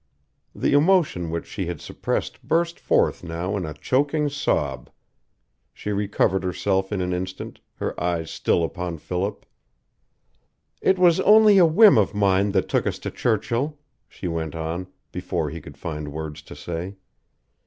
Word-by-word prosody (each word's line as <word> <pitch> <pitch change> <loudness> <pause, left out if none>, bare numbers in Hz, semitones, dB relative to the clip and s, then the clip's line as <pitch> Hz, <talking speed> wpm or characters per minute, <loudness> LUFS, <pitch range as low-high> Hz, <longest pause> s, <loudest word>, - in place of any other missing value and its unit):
The - - 0
emotion 150 - +3
which 85 0 -3
she 95 -5 -5
had 85 -3 -4
suppressed - - -3
burst 170 +1 0
forth - - +1
now 85 +4 -3
in 90 -5 -3
a 75 - -6
choking 145 - +1
sob. 75 - -1 0.9
She 105 - -4
recovered 100 -1 +1
herself 95 +2 -1
in 100 -3 -1
an 90 0 -1
instant, 95 +1 -5 0.2
her - - -3
eyes 85 -2 -1
still 85 - +1
upon 85 0 -3
Philip. 95 +6 -3 1.4
"It 190 - +3
was 175 -2 +5
only 210 -1 +7
a 175 - +7
whim 165 - +7
of 100 0 +1
mine 100 0 +2
that 95 - +1
took - - 0
us - - -1
to - - -6
Churchill," 120 +6 -1 0.3
she 90 - -6
went 80 -2 -3
on, 80 +3 -4 0.2
before - - -3
he - - -7
could - - -12
find 75 -3 -5
words 75 -1 -6
to - - -12
say. 90 +3 -5
95 Hz, 155 wpm, -23 LUFS, 85-140 Hz, 1.4 s, only